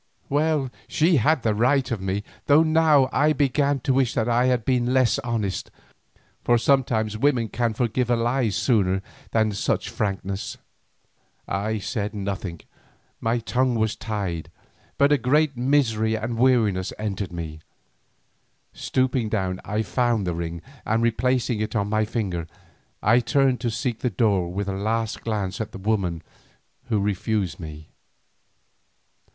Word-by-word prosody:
Well, 145 Hz, -2 st, +1 dB, 0.2 s
she 160 Hz, +1 st, +3 dB
had 135 Hz, +3 st, +2 dB
the 110 Hz, -, +2 dB
right 125 Hz, +4 st, +2 dB
of 110 Hz, -5 st, -2 dB
me, 95 Hz, +2 st, -2 dB, 0.2 s
though 150 Hz, +3 st, +6 dB
now 155 Hz, -4 st, +4 dB
I 155 Hz, +1 st, +3 dB
began 140 Hz, 0 st, +1 dB
to 135 Hz, -, +1 dB
wish 130 Hz, -2 st, +1 dB
that 110 Hz, -, +1 dB
I 120 Hz, +1 st, +3 dB
had 125 Hz, -3 st, +1 dB
been 125 Hz, -1 st, +1 dB
less 125 Hz, -4 st, +3 dB
honest, 110 Hz, -6 st, -2 dB, 0.7 s
for 120 Hz, -, +4 dB
sometimes 115 Hz, -4 st, +1 dB
women 125 Hz, -4 st, +2 dB
can 115 Hz, -1 st, -1 dB
forgive 120 Hz, +1 st, 0 dB
a 120 Hz, -, +4 dB
lie 120 Hz, +1 st, +1 dB
sooner 95 Hz, -2 st, +1 dB, 0.3 s
than 110 Hz, -1 st, +2 dB
such 100 Hz, -, -1 dB
frankness. 100 Hz, -1 st, -3 dB, 0.9 s
I 105 Hz, +4 st, -1 dB
said 105 Hz, 0 st, -3 dB
nothing, 95 Hz, -4 st, -4 dB, 0.6 s
my 115 Hz, +1 st, 0 dB
tongue 125 Hz, +2 st, 0 dB
was 110 Hz, -1 st, 0 dB
tied, 100 Hz, -7 st, -4 dB, 0.5 s
but 140 Hz, +1 st, +4 dB
a 145 Hz, -, +4 dB
great 145 Hz, +4 st, +2 dB
misery 120 Hz, -4 st, +2 dB
and 110 Hz, +2 st, -3 dB
weariness 115 Hz, -7 st, +2 dB
entered 100 Hz, -3 st, -3 dB
into 85 Hz, -, -10 dB
me. 80 Hz, -2 st, -6 dB, 1.1 s
Stooping 130 Hz, -3 st, 0 dB
down 95 Hz, -4 st, -2 dB
I 105 Hz, +2 st, -1 dB
found 120 Hz, 0 st, 0 dB
the 90 Hz, -, -1 dB
ring, 85 Hz, 0 st, -5 dB, 0.2 s
and 115 Hz, +1 st, 0 dB
replacing 120 Hz, 0 st, +1 dB
it 110 Hz, +2 st, -3 dB
on 100 Hz, -1 st, 0 dB
my 110 Hz, 0 st, +1 dB
finger, 95 Hz, -7 st, -3 dB, 0.6 s
I 115 Hz, +4 st, +5 dB
turned 135 Hz, -1 st, +2 dB
to 120 Hz, -, 0 dB
seek 120 Hz, 0 st, -2 dB
the 125 Hz, -, 0 dB
door 95 Hz, -4 st, +1 dB
with 100 Hz, +2 st, -3 dB
a 100 Hz, -, -1 dB
last 110 Hz, +3 st, -2 dB
glance 105 Hz, -1 st, -2 dB
at 110 Hz, -, -4 dB
the -, -, -6 dB
woman 95 Hz, -5 st, -1 dB, 0.6 s
who 110 Hz, -4 st, 0 dB
refused 100 Hz, -2 st, -1 dB
me. 80 Hz, -2 st, -9 dB
110 Hz, 150 wpm, -24 LUFS, 100-125 Hz, 1.1 s, though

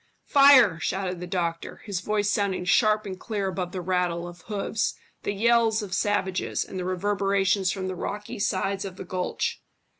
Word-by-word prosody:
"Fire!" 270 Hz, -, +6 dB
shouted 180 Hz, +2 st, -2 dB
the 180 Hz, -, -6 dB
doctor, 170 Hz, -2 st, -3 dB
his 200 Hz, -4 st, -2 dB
voice 205 Hz, +2 st, 0 dB
sounding 200 Hz, -3 st, 0 dB
sharp 215 Hz, +2 st, +3 dB
and 190 Hz, -2 st, -6 dB
clear 205 Hz, -4 st, -3 dB
above 185 Hz, -1 st, -3 dB
the 185 Hz, -, -4 dB
rattle, 175 Hz, -1 st, -1 dB
of 175 Hz, 0 st, -11 dB
hoofs, 210 Hz, +1 st, -1 dB, 0.3 s
the -, -, -2 dB
yells 225 Hz, +1 st, +3 dB
of 205 Hz, -, -6 dB
the -, -, -7 dB
savages, 190 Hz, -3 st, 0 dB
and 185 Hz, -, -6 dB
the 180 Hz, -, -3 dB
reverberations 195 Hz, 0 st, +1 dB
from 190 Hz, -2 st, -3 dB
the 185 Hz, -, -3 dB
rocky 210 Hz, +5 st, -5 dB
sides 195 Hz, 0 st, 0 dB
of 190 Hz, -2 st, -6 dB
the 190 Hz, -, -8 dB
gulch. 180 Hz, 0 st, -2 dB
195 Hz, 180 wpm, -26 LUFS, 180-205 Hz, 0.3 s, Fire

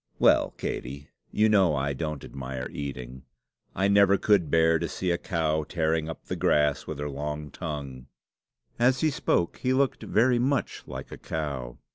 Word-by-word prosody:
"Well, -, -, +4 dB
Katey, 70 Hz, +3 st, -5 dB, 0.2 s
you 110 Hz, +1 st, +3 dB
know 95 Hz, -7 st, +4 dB
I 70 Hz, 0 st, -1 dB
don't 75 Hz, +1 st, -4 dB
admire 65 Hz, -1 st, -5 dB
eating. 65 Hz, -3 st, -6 dB, 0.5 s
I 95 Hz, +1 st, +2 dB
never 100 Hz, -1 st, +5 dB
could 95 Hz, -8 st, +3 dB
bear 80 Hz, +1 st, +4 dB
to 85 Hz, -, -2 dB
see 90 Hz, -2 st, -2 dB
a 85 Hz, -, +1 dB
cow 80 Hz, -4 st, 0 dB
tearing 80 Hz, 0 st, -1 dB
up 80 Hz, -, -8 dB
the -, -, -3 dB
grass 75 Hz, -1 st, +2 dB
with 80 Hz, -, -5 dB
her 75 Hz, 0 st, -3 dB
long 75 Hz, +1 st, -5 dB
tongue." 70 Hz, -5 st, -6 dB, 0.7 s
As 125 Hz, +2 st, +3 dB
he 155 Hz, -, +3 dB
spoke 85 Hz, -10 st, 0 dB
he 130 Hz, 0 st, 0 dB
looked 135 Hz, -2 st, +1 dB
very 120 Hz, +3 st, +2 dB
much 135 Hz, +3 st, 0 dB
like -, -, -7 dB
a -, -, -8 dB
cow. 70 Hz, -6 st, -4 dB
80 Hz, 170 wpm, -27 LUFS, 70-100 Hz, 0.7 s, never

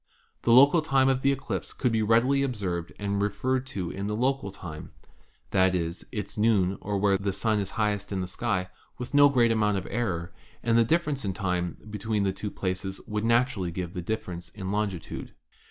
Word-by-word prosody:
The 120 Hz, -, +2 dB
local 140 Hz, +7 st, +7 dB
time 135 Hz, -3 st, +3 dB
of 130 Hz, -1 st, +1 dB
the 140 Hz, -, +4 dB
eclipse 135 Hz, -1 st, -3 dB
could 125 Hz, -, 0 dB
be 110 Hz, -1 st, +1 dB
readily 120 Hz, +6 st, +3 dB
pbserved 95 Hz, -10 st, -2 dB
and 100 Hz, 0 st, -1 dB
referred 130 Hz, +5 st, 0 dB
to 95 Hz, -9 st, -4 dB
the 100 Hz, +2 st, -3 dB
local 130 Hz, -2 st, 0 dB
time 85 Hz, -5 st, -8 dB, 0.3 s
— -, -, -36 dB
that 95 Hz, 0 st, +3 dB
is, 85 Hz, 0 st, -2 dB
its 105 Hz, -2 st, -5 dB
noon 100 Hz, -4 st, +3 dB
or 100 Hz, 0 st, -2 dB
when 100 Hz, -1 st, +3 dB
the 100 Hz, 0 st, 0 dB
Sun 105 Hz, +2 st, 0 dB
is 100 Hz, -1 st, -2 dB
highest 105 Hz, -2 st, -1 dB
in 95 Hz, -, -1 dB
the 90 Hz, -, -1 dB
sky, 90 Hz, 0 st, -2 dB, 0.3 s
with 125 Hz, +2 st, -6 dB
no 145 Hz, 0 st, +7 dB
great 120 Hz, -4 st, +3 dB
amount 105 Hz, -2 st, +2 dB
of 95 Hz, -, -4 dB
error, 85 Hz, -7 st, -2 dB, 0.3 s
and 115 Hz, -1 st, +2 dB
the 115 Hz, -, +6 dB
difference 150 Hz, +1 st, 0 dB
in 100 Hz, -2 st, -1 dB
time 90 Hz, -2 st, -2 dB
between 105 Hz, 0 st, -1 dB
the 95 Hz, -1 st, +1 dB
two 105 Hz, +2 st, -4 dB
places 95 Hz, 0 st, -3 dB
would 105 Hz, 0 st, -2 dB
naturally 115 Hz, -5 st, +2 dB
give 85 Hz, 0 st, -5 dB
the 90 Hz, -, -4 dB
difference 90 Hz, -3 st, -4 dB
in 95 Hz, -2 st, -6 dB
longitude. 100 Hz, -4 st, -3 dB
105 Hz, 200 wpm, -27 LUFS, 95-120 Hz, 0.3 s, local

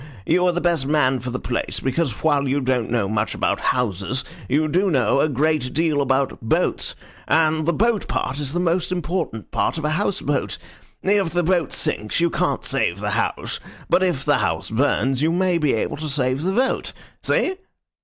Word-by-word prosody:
You 180 Hz, 0 st, +3 dB
are -, -, +4 dB
the 175 Hz, -, -1 dB
best 170 Hz, -6 st, +1 dB
man 135 Hz, -3 st, +2 dB
for 125 Hz, -, -5 dB
the 125 Hz, -, -2 dB
place, 120 Hz, -, -3 dB
because, 135 Hz, -2 st, -1 dB
while 145 Hz, -3 st, +2 dB
you 135 Hz, +2 st, +1 dB
don't 130 Hz, -3 st, 0 dB
know 115 Hz, -4 st, +1 dB
much 110 Hz, +1 st, -1 dB
about -, -, 0 dB
houses, 120 Hz, 0 st, -1 dB, 0.2 s
you 150 Hz, +4 st, +2 dB
do 185 Hz, +6 st, +2 dB
know 135 Hz, -3 st, +2 dB
a 155 Hz, -, +3 dB
great 145 Hz, -2 st, 0 dB
deal 155 Hz, -3 st, +2 dB
about 135 Hz, 0 st, 0 dB
boats, 115 Hz, -, 0 dB, 0.3 s
and 155 Hz, -1 st, +2 dB
the -, -, +4 dB
boat 225 Hz, +2 st, +1 dB
part 135 Hz, +3 st, -2 dB
is 140 Hz, -1 st, -3 dB
the 175 Hz, -, 0 dB
most 175 Hz, 0 st, 0 dB
important 170 Hz, -, -3 dB
part -, -, 0 dB
of 160 Hz, -, -3 dB
a 150 Hz, -, +1 dB
house 200 Hz, +4 st, 0 dB
boat. 145 Hz, 0 st, -1 dB, 0.5 s
If 195 Hz, -2 st, +2 dB
the 175 Hz, +2 st, 0 dB
boat 175 Hz, -3 st, +1 dB
sinks, 105 Hz, +7 st, -1 dB
you 170 Hz, 0 st, +2 dB
can't -, -, 0 dB
save -, -, 0 dB
the -, -, -2 dB
house; -, -, -2 dB, 0.3 s
but -, -, +5 dB
if 175 Hz, -8 st, 0 dB
the 145 Hz, -, +3 dB
house 80 Hz, +5 st, -1 dB
burns, 135 Hz, +2 st, +1 dB
you 160 Hz, +2 st, +3 dB
may 180 Hz, 0 st, +2 dB
be 150 Hz, -4 st, +2 dB
able 110 Hz, -, -2 dB
to 155 Hz, +1 st, -4 dB
save 130 Hz, -1 st, 0 dB
the 185 Hz, +4 st, 0 dB
boat. 260 Hz, +5 st, 0 dB, 0.3 s
See?" 375 Hz, -, +1 dB
150 Hz, 200 wpm, -22 LUFS, 130-170 Hz, 0.5 s, but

